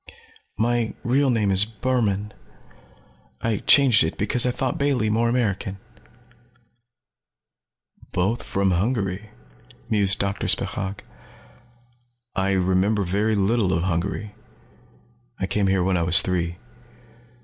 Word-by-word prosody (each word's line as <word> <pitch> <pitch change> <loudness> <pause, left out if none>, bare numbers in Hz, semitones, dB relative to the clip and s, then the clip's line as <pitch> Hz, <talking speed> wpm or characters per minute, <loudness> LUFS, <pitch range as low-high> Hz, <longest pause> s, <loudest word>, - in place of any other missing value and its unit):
My 120 0 0
real 135 +3 +2
name 110 -5 +1
is 95 +1 +5
Burhmann. 105 -2 -1 1.1
I 115 -2 -1
changed 130 - +5
it 80 - -3
because 115 +5 +1
I - - +2
thought 125 +1 -2
Bailey 130 -7 +1
more 115 +2 +1
American." 100 -5 -1 2.3
"Both 100 +7 0
from 100 -1 0
Hungary," 100 +1 -1 0.6
mused 100 -3 +2
Doctor 100 0 -2
Spechaug. 100 0 -2 1.3
"I 95 0 0
remember 95 +3 +1
very 105 +4 0
little 100 0 +1
of 85 +1 0
Hungary. 95 +4 -2 1.1
I 95 - -1
came 100 +1 0
here 95 -1 +2
when 95 0 +1
I - - 0
was 85 0 +5
three. 85 -2 -2
100 Hz, 115 wpm, -23 LUFS, 95-115 Hz, 2.3 s, is